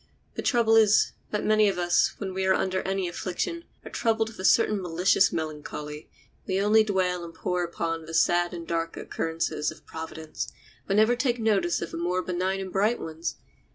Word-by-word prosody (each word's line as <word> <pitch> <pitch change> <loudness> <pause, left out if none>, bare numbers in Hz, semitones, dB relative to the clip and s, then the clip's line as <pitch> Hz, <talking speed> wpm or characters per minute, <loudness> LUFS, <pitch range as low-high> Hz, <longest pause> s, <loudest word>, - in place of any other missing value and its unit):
The - - -4
trouble 230 -3 +3
is, 215 -1 +5 0.2
that 210 - -2
many 215 -1 +4
of 195 - -3
us, 175 -1 +2
when 190 -2 -4
we 190 0 -1
are 190 - +5
under 185 0 0
any 190 -1 -1
affliction, 195 - -3 0.2
are - - -8
troubled 225 -1 +1
with 225 - -14
a - - -5
certain 215 -2 +4
malicious 180 +2 +3
melancholy. 150 -1 -5 0.4
We 190 0 0
only 215 +2 +5
dwell 185 -4 0
and 165 -1 -9
pore 180 +1 -1
upon 165 -1 -3
the 165 - -5
sad 175 +1 +3
and 170 -2 -7
dark 165 0 -2
occurrences 160 -2 -2
of 155 - -12
Providence, 160 -1 -6 0.4
but 195 - +1
never 220 +3 +5
take 245 -1 0
notice 200 -8 +1
of 170 - -6
the - - -5
more 180 +2 -1
benign 185 +2 -1
and 190 -1 -6
bright 210 +5 +2
ones. 160 +1 -4
185 Hz, 190 wpm, -27 LUFS, 170-210 Hz, 0.4 s, is